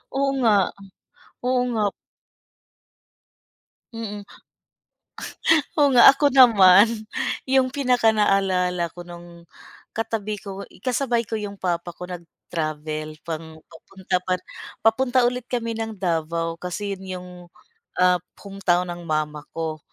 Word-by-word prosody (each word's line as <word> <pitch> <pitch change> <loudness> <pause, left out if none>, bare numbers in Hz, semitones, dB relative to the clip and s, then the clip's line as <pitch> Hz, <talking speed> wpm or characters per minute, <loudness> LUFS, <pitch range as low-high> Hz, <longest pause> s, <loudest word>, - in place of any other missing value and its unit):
Oo 275 0 +1
nga, 230 -4 +4 0.9
oo 255 0 +2
nga. 220 -2 0 2.1
Mm, 210 -3 -6 1.5
oo 290 - +6
nga. 240 - +10
Ako 290 +1 +2
naman, 210 -6 +7 0.6
'yong 260 -1 +3
pinakanaalala 195 - +2
ko 175 0 -11
no'ng 170 0 -12 0.5
katabi 215 -2 -2
ko 195 0 -7 0.2
kasabay 245 -2 0
ko 220 0 -4
'yong 205 -1 -6
papa 175 -2 -3
ko - - -9
nag-travel 155 -3 -5
pang 160 -1 -6 0.2
papunta 185 +3 -5
par 185 0 +1 0.4
papunta 245 +3 +3
ulit 245 0 -1
kami 235 -2 -2
ng 225 -1 -4
Davao 165 -2 -2
kasi 195 +2 -4
'yon - - -12
'yong, 180 -1 -7 0.7
ah, 180 0 +3 0.2
hometown 180 -3 0
ng 175 -1 -8
mama 150 -1 -2
ko, 160 -1 -3
190 Hz, 110 wpm, -23 LUFS, 170-225 Hz, 2.1 s, nga